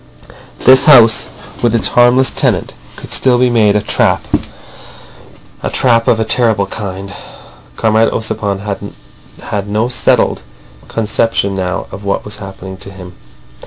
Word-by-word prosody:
This 130 +1 +7
house 115 -8 +6 0.3
with 120 -1 +1
its 115 - +1
harmless 120 +2 +3
tenant - - -1 0.2
could - - -11
still 125 -2 +3
be 125 0 +2
made 105 -3 +3
a 105 - +2
trap - - +1
of—a - - -9
trap 115 -3 +2
of 115 - +3
a 110 - 0
terrible 110 -3 +2
kind. 100 -1 -7 0.6
Comrade 110 0 +2
Ossipon 105 -2 -3 0.5
had 105 -4 -4
no 110 +4 -1
settled 125 - +1 0.5
conception 110 -2 -1
now 90 -1 -3
of 100 - -9
what 100 0 -2
was 105 0 -7
happening 95 -2 -9
to 100 - -9
him. 90 -2 -11
110 Hz, 135 wpm, -13 LUFS, 100-115 Hz, 0.6 s, This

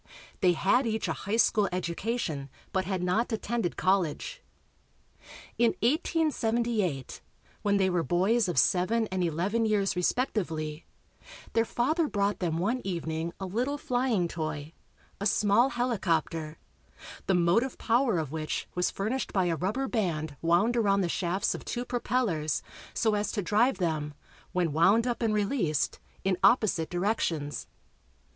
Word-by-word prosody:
They 180 -2 +4
had 240 +9 +2
each 220 0 -1
a - - 0
high 205 +3 -2
school 210 -3 +3
education 175 - -2 0.2
but 190 -1 0
had 185 -1 -2
not 215 +8 +1
attended 225 -4 -2
college. 185 -5 0 1.2
In 235 -1 +3
1878, 235 - 0 0.4
when 200 -1 +2
they 190 -1 +3
were 180 -2 +1
boys 190 +7 +2
of 175 - -2
seven 190 - +3
and 185 -1 0
eleven 180 +8 0
years 210 -3 +1
respectively, 170 - -1 0.7
their 225 0 +3
father 305 +9 +1
brought 205 -4 0
them 165 -3 -1
one 225 +9 0
evening 165 -3 -3
a 190 - -4
little 245 +10 -1
flying 245 -9 0
toy, 155 -2 -5 0.5
a 200 - +1
small 210 +5 +3
helicopter, 165 - -1 0.7
the 190 - +3
motive 180 +10 +2
power 235 -3 +2
of 155 -4 -2
which 155 -1 -3
was 180 0 +1
furnished 230 +6 -2
by 190 -2 +1
a 170 -1 +1
rubber 210 +11 -1
band 160 - -1
wound 175 +8 +3
around 200 -4 +3
the 175 - 0
shafts 185 +4 0
of - - -7
two 245 0 -3
propellers 235 - -1 0.3
so 220 -2 +2
as 210 0 0
to 205 - -1
drive 215 +6 +2
them, 155 -5 -2 0.4
when 175 -4 0
"wound 195 +9 +4
up" 245 -1 -2
and 220 -2 +1
released, 200 - 0 0.2
in 190 -2 0
opposite 215 -9 +3
directions. 175 -6 -1
195 Hz, 145 wpm, -29 LUFS, 170-230 Hz, 1.2 s, They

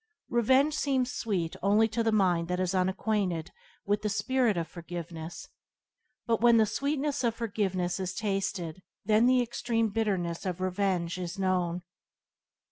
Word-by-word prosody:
Revenge 260 +5 +3
seems 265 -4 0
sweet 185 -8 -2
only 210 +3 +4
to 230 +2 -1
the 225 0 +2
mind 180 -5 +2
that 180 0 -1
is 185 0 0
unacquainted 185 -2 0 0.3
with 205 +1 +1
the 210 - -1
spirit 240 -1 +1
of 165 -1 -1
forgiveness; 170 -1 -7 0.8
but 230 -2 +1
when 235 -1 +6
the 220 - +5
sweetness 285 +4 -1
of 230 -2 +1
forgiveness 195 -6 -1
is 185 -1 -3
tasted 195 -5 -2 0.2
then 220 +3 +4
the 255 -1 +4
extreme 230 -1 -1
bitterness 195 -6 -1
of 185 -2 -3
revenge 185 -2 -1
is 180 +1 -5
known. 180 -2 0
200 Hz, 145 wpm, -29 LUFS, 180-230 Hz, 0.8 s, when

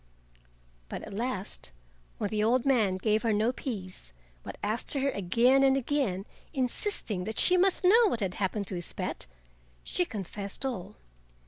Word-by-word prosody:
But - - -5
at - - -8
last, 210 - -3 0.5
when 205 - -2
the 210 -1 +1
old 240 +3 +3
man 225 -9 +3
gave 215 +2 +1
her 230 - +1
no 215 +3 +2
peace, 185 - -6 0.3
but - - -8
asked 215 +7 -2
her 275 0 +1
again 235 +8 +3
and 270 0 +5
again, 250 -8 0 0.3
insisting 250 - -1
that 220 - -4
she 365 - +4
must 370 +1 +3
know 440 +5 +7
what 240 - 0
had 190 -4 -1
happened 200 +2 -1
to 185 - -4
his 175 -1 -4
pet, - - -3 0.6
she 360 - 0
confessed 200 - -4
all. 210 -6 -4
220 Hz, 160 wpm, -29 LUFS, 195-270 Hz, 0.6 s, know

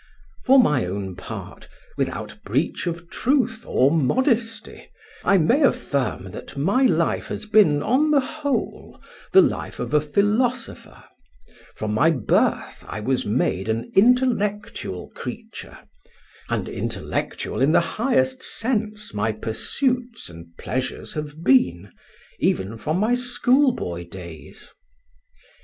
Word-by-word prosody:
For 270 +1 +6
my 150 - +3
own 95 0 -4
part, 90 - -9 0.3
without - - -4
breach 140 - -1
of 170 0 -4
truth 245 -3 0
or 135 +2 +3
modesty, 225 - 0 0.3
I 195 - +4
may 230 - +3
affirm 135 - 0
that - - -9
my 195 - +2
life 165 -3 0
has - - -5
been, 205 -9 +4
on 285 +6 +2
the 295 -2 +5
whole, 285 +1 -3 0.3
the 380 - +8
life - - -3
of - - -4
a 150 - +5
philosopher: 210 - -1 0.7
from 105 -1 -3
my 145 +10 +4
birth 135 -9 0
I - - -5
was 130 +4 -1
made 105 -1 0
an 115 +1 -2
intellectual 210 - +1
creature, - - -8 0.7
and - - -1
intellectual - - -3
in 140 +3 +4
the - - +5 0.2
highest 260 +1 +1
sense 215 -3 -2
my 105 +2 0
pursuits 240 - -2
and 85 0 -11
pleasures 130 0 -4
have 150 +1 -6
been, 100 - +3 0.5
even 95 +4 0
from 150 +10 -2
my 215 +5 +2
schoolboy 245 - +1
days. 85 -3 -10
170 Hz, 120 wpm, -23 LUFS, -, 0.7 s, the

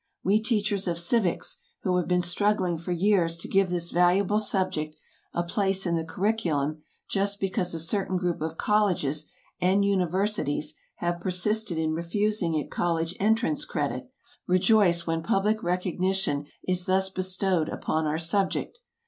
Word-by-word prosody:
We 205 +4 +3
teachers 210 -4 0
of 170 -1 0
civics, 175 +2 0 0.2
who 185 -1 +1
have 180 - -1
been 180 0 +2
struggling 180 -1 +1
for 170 +2 -5
years 175 -2 +2
to 170 - -6
give 195 -1 +2
this 175 -1 -2
valuable 185 +4 +3
subject 185 -7 -1 0.4
a 175 - -1
place 195 +2 0
in 170 -1 +1
the 165 - -1
curriculum 160 -5 -1 0.3
just 200 0 0
because 185 -2 -1
a - - -2
certain 190 +3 -1
group 175 -3 -2
of 160 +1 -3
colleges 175 -8 +1 0.3
and 195 +3 +3
universities 185 -5 0 0.2
have 175 0 -2
persisted 185 +1 +2
in 160 -1 0
refusing 175 +1 0
it 150 - -3
college 165 0 -1
entrance 230 +8 +1
credit, - - -3 0.4
rejoice 180 -2 +4
when 165 0 -1
public 210 +3 +1
recognition 180 -3 -1 0.2
is 180 -1 +1
thus 190 0 +2
bestowed 185 -2 0
upon 155 0 -1
our 150 +1 0
subject. 195 - 0
180 Hz, 150 wpm, -27 LUFS, 170-200 Hz, 0.4 s, rejoice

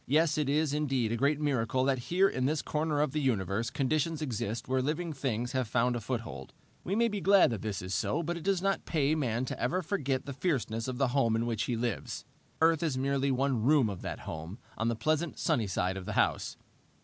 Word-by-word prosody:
Yes, 155 +3 +3
it 145 -2 0
is 150 0 +2
indeed 135 -6 0
a - - +1
great 140 +5 +2
miracle 130 -4 +1
that 135 -1 +2
here 185 +3 +4
in 130 -8 -1
this 150 0 0
corner 150 -1 0
of 150 - +1
the 150 - -1
universe 110 -4 0
conditions 155 +3 0
exist 115 -6 -3
where 130 0 +1
living 155 +4 -2
things 125 -3 -2
have 130 -3 0
found 120 +2 +1
a - - -1
foothold. 115 +1 -5 0.3
We 195 - -1
may 235 +2 +3
be 205 -3 -3
glad 195 -7 +6
that 110 - -3
this 100 -4 -3
is 90 +1 -4
so, 145 - 0
but 170 +2 -2
it 170 - -6
does 190 +1 0
not 195 0 0
pay 150 -2 +1
man 125 -5 0
to - - -5
ever 180 +9 0
forget 140 -7 -1
the 140 - -5
fierceness 130 -7 -1
of 130 -1 -3
the 135 -1 +2
home 120 -4 +2
in 115 +1 0
which 115 -2 -1
he 120 - -1
lives. 120 -2 -3 0.4
Earth 160 -1 +4
is 155 -6 0
merely 140 +1 +1
one 135 -2 +1
room 130 -3 +4
of 95 - -7
that - - -5
home, 80 +6 -6 0.2
on 115 - -1
the 115 - +1
pleasant, 155 +6 0
sunny 125 -10 +1
side 95 0 -1
of 95 - -6
the - - -4
house. - - +1
135 Hz, 230 wpm, -30 LUFS, 115-155 Hz, 0.4 s, glad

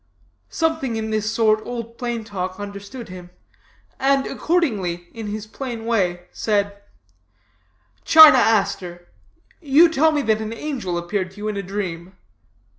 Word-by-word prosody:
Something 320 -7 -1
in 220 0 -3
this 215 0 -1
sort 220 -1 +2
Old 235 -1 -7
Plain 240 -2 -3
Talk 185 -3 -5
understood 205 +4 -8
him, 180 -1 -10 0.7
and, 275 0 +2
accordingly, 200 - -1
in 225 -2 -7
his 210 +1 -5
plain 230 0 -6
way, 185 -7 0
said: 205 -1 -1 1.2
'China 315 -5 +9
Aster, 185 -6 0 0.5
you 305 +2 +6
tell 315 0 +3
me 295 -2 0
that 220 -2 +1
an 220 +1 -4
angel 230 -9 -4
appeared 185 +2 -2
to 190 - -20
you 210 +1 -5
in 210 - -3
a 200 - -2
dream. 185 -2 -5
215 Hz, 140 wpm, -21 LUFS, 195-245 Hz, 1.2 s, China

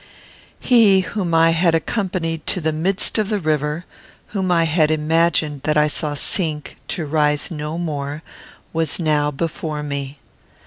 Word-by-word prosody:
He 215 -6 +5
whom 180 -3 -2
I 165 0 +5
had 165 0 +3
accompanied 165 -3 -2
to 185 - +2
the 160 -1 0
midst 185 +8 0
of 215 -1 0
the 210 - +1
river; 155 -1 -1 0.4
whom 190 -3 -1
I 170 -1 +4
had 160 -1 +2
imagined 155 -1 +1
that 150 0 +2
I 150 - +5
saw 150 0 -2
sink 155 0 -3
to 165 - -3
rise 150 0 +1
no 150 0 -4
more, 150 -2 -4 0.5
was 160 -2 0
now 150 -3 +2
before 150 0 -3
me. 140 -1 -4
160 Hz, 150 wpm, -20 LUFS, 150-175 Hz, 0.5 s, He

